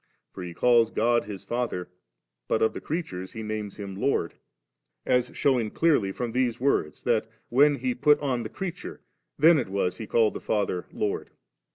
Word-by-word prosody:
For 95 - -8
He 90 -1 -7
calls 120 +1 +4
God 120 +1 +1
His 100 -3 -7
Father, 120 -7 -2 0.6
but 110 - +1
of 110 - +2
the - - -6
creatures 95 - -4
He 110 - -6
names 105 -1 -4
Him 100 -2 -6
Lord; 100 - 0 0.7
as 125 0 +2
shewing 125 -6 +2
clearly 140 -9 +2
from 120 +3 -4
these 125 -1 0
words, 120 - 0
that, - - +1 0.2
when 145 +4 +5
He 130 -1 -1
put 150 +4 +4
on 130 -4 -1
the 110 - -5
crea 190 - -4
ture3, - - -9 0.4
then 160 +1 +6
it 120 - -2
was 95 -2 -1
He 110 - -6
called 110 -1 +3
the - - -5
Father 100 -4 -1
Lord. 105 - -2
115 Hz, 185 wpm, -26 LUFS, 100-130 Hz, 0.7 s, then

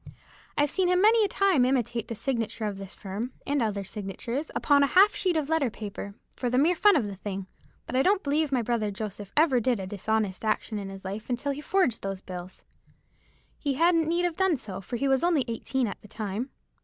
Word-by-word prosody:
I've 290 0 +2
seen 375 +1 +2
him 360 0 +3
many 440 +3 +5
a - - +3
time 390 -9 +3
imitate 240 -3 0
the 230 - -4
signature 230 -2 -2
of 200 -2 -3
this 195 -1 -8
firm, 210 +6 -5
and 285 -1 +1
other 205 -3 -1
signatures, 210 - -5
upon 285 -1 +4
a 280 - +5
half 390 +7 +6
sheet 365 -4 +1
of 300 -3 0
letter 315 -5 +2
paper, 205 -2 -7 0.2
for 250 - -1
the 250 - +1
mere 310 +7 +4
fun 410 +4 +5
of 270 -8 +2
the 200 -2 -6
thing: 195 -1 -5 0.4
but 255 - -5
I 260 - +4
don't 390 +5 +3
believe 295 +1 +1
my 250 -3 +1
brother 225 -2 0
Joseph 205 -1 -6
ever 295 -5 +5
did 240 -1 +1
a 190 - -4
dishonest 205 0 -1
action 215 0 -1
in 195 -1 -6
his 195 0 -10
life 205 +5 -5
until 250 +3 -1
he 280 +1 -5
forged 300 - +1
those 195 -1 -4
bills. 185 -1 -9 1.0
He 280 -3 -1
hadn't 330 +1 +3
need 345 +1 +1
have 345 -2 -2
done 380 -5 +3
so, 195 -5 -7
for 215 - -5
he 275 - 0
was 270 +1 +2
only 330 -7 +3
eighteen 245 +3 -1
at 210 - -5
the - - -14
time." 215 +4 -4
245 Hz, 225 wpm, -27 LUFS, 205-305 Hz, 1.0 s, half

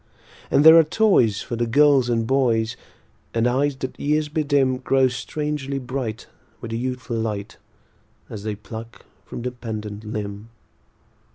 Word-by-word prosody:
And 145 - +4
there 160 +1 +10
are - - +6
toys 155 - +2
for 120 - -4
the 120 0 -1
girls 140 0 +4
and 115 -1 +1
boys; 115 -3 +1 0.6
And 115 0 +2
eyes 135 +3 +1
that 130 -1 -6
years 150 +1 0
bedim 145 -4 +1
Grow 135 0 +2
strangely 145 +2 -3
bright, 125 -4 -4 0.3
with 115 - -7
a - - -2
youthful 125 0 -3
light, 105 -2 -4 0.7
As 105 - -8
they 105 0 -3
pluck 115 +2 -10 0.2
from - - -7
the 125 - -2
pendant 110 -3 -6
limb. 105 0 -6
125 Hz, 150 wpm, -22 LUFS, 110-140 Hz, 0.7 s, there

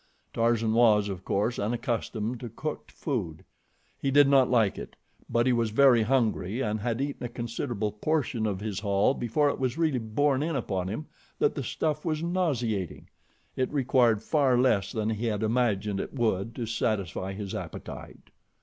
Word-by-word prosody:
Tarzan 115 -1 +2
was, 110 -3 +4
of 95 -2 -6
course, 105 +6 0
unaccustomed 115 +1 -2
to 120 - -6
cooked 150 +7 -6
food. 95 - -4 0.5
He 140 - 0
did 145 +1 +6
not 135 -2 +5
like 115 -5 +2
it; - - -9 0.3
but 120 0 +2
he 130 - +3
was 115 -2 +1
very 125 +1 +5
hungry 110 -3 +1
and 110 -4 -1
had 115 +2 -2
eaten 140 -1 -3
a 120 - -3
considerable 115 -2 -3
portion 115 -1 -1
of 100 -2 -3
his 105 -2 -3
haul 100 +3 +2
before 140 +4 +1
it - - -3
was 130 +2 -1
really 155 -6 +1
borne 130 +5 +1
in 160 +1 -1
upon 95 -8 -2
him 110 +11 -4 0.3
that - - +2
the - - -3
stuff 150 -1 -2
was 160 -2 -1
nauseating. 125 - -1 0.5
It 130 - -1
required 125 -6 +3
far 140 -5 +3
less 120 -7 +2
than 110 -1 -1
he 110 +2 -2
had 105 -1 -1
imagined 110 -4 +1
it - - -5
would 115 -3 0
to 120 - -3
satisfy 100 -4 -2
his 100 -1 -6
appetite. - - -8
115 Hz, 175 wpm, -28 LUFS, 105-135 Hz, 0.5 s, did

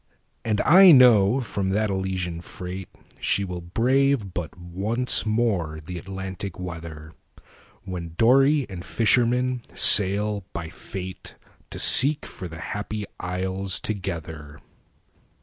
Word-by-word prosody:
And 105 -2 0
I 185 +2 +7
know 125 -3 +6
from 100 -4 -3
that 105 +1 0
Elysian 95 -3 -3
freightShe 90 +2 -5
will 90 -2 -6
brave 120 +3 0
but 85 -1 -6
once 100 +9 -1
more 100 -9 -1
the 90 0 -6
Atlantic 95 0 -7
weather, 80 -3 -8 0.7
When 85 -3 -7
dory 135 +4 +4
and 90 -3 -8
fisherman 125 +3 +1
sail 100 +1 +4
by 85 -1 -5
fateTo 95 +1 -9 0.4
seek 145 +3 +5
for 90 - -9
the 80 -1 -10
Happy 105 +2 -5
Isles 95 +1 -2
together. 80 -7 -6
95 Hz, 110 wpm, -24 LUFS, 90-115 Hz, 0.7 s, I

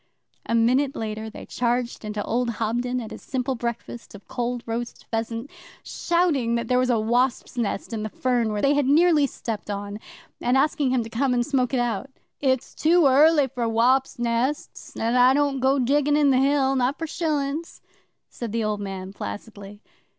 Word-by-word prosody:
A 230 - +1
minute 255 +5 +2
later 220 0 -4
they - - -10
charged 240 0 -1
into 210 -1 -3
old 240 +2 -1
Hobden 240 +3 -1
at 225 -3 -7
his - - -9
simple 260 0 -2
breakfast 235 -1 -6
of 205 - -14
cold 245 -1 -3
roast 235 +1 -5
pheasant, 230 +3 -3 0.3
shouting 320 -10 0
that 235 0 -2
there 250 +1 +2
was 255 0 +1
a 235 -2 +3
wasps' 240 +4 0
nest 230 -2 -2
in 220 - -3
the 215 - -3
fern 240 -1 0
which 210 -1 -2
they 280 +1 +4
had 290 -2 +1
nearly 305 0 +4
stepped 220 -5 -6
on, 205 0 -4 0.4
and 250 +2 +2
asking 285 -1 +2
him 250 -2 +1
to 225 - -8
come 250 +2 +1
and 240 0 +1
smoke 265 -4 0
it 260 - +1
out. 240 +2 -2 0.3
'It's 260 -3 0
too 335 +1 +3
early 290 +2 +5
for 240 -3 -3
wops 255 +4 +2
nests, 240 +4 -2
an' 230 +1 0
I 250 +1 +5
don't 285 -2 +1
go 265 +2 +3
diggin' 290 +3 +2
in 290 -2 +4
the 255 - +3
Hill, 270 0 +2
not 260 +2 +1
for 325 - -3
shillin's,' 310 -1 -2 0.5
said 235 -3 -6
the 230 0 -1
old 210 -1 -1
man 195 -1 -6
placidly. 205 0 -8
245 Hz, 185 wpm, -24 LUFS, 230-275 Hz, 0.5 s, early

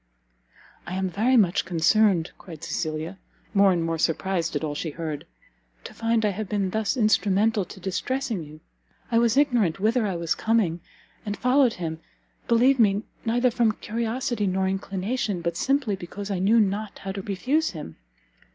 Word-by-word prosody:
"I 175 - -4
am 190 -1 -1
very 240 +7 +3
much 190 -5 +3
concerned," 180 +1 +3
cried 165 -4 -11
Cecilia, 160 +3 -3 0.3
more 200 -1 +5
and 175 -2 +1
more 165 -1 -2
surprised 170 +1 0
at - - -1
all 150 -2 -2
she 160 +3 -3
heard, 155 -1 -5 0.6
"to - - -9
find 230 -1 +1
I 210 - +2
have 200 +1 -5
been 200 -3 0
thus 220 +4 -1
instrumental 210 -1 +2
to 195 - -11
distressing 225 +4 -2
you. 155 +1 -13 0.5
I 230 - +4
was 235 +1 +2
ignorant 240 - +2
whither 220 +2 +2
I 190 - -2
was 170 -1 0
coming, 215 -7 +1 0.4
and 205 -1 -4
followed 250 -1 +3
him, 160 -2 -5 0.5
believe 250 +3 +4
me, 205 -2 +3 0.2
neither 245 +2 +2
from 230 -2 +2
curiosity 230 +1 -2
nor 190 0 0
inclination, 195 +1 -2
but 170 0 -2
simply 270 0 +1
because 195 +3 -7
I 190 - -1
knew 210 +5 +4
not 210 0 -1
how 195 - -5
to 195 0 -5
refuse 255 +12 0
him. 150 - -8
200 Hz, 170 wpm, -25 LUFS, 180-230 Hz, 0.6 s, more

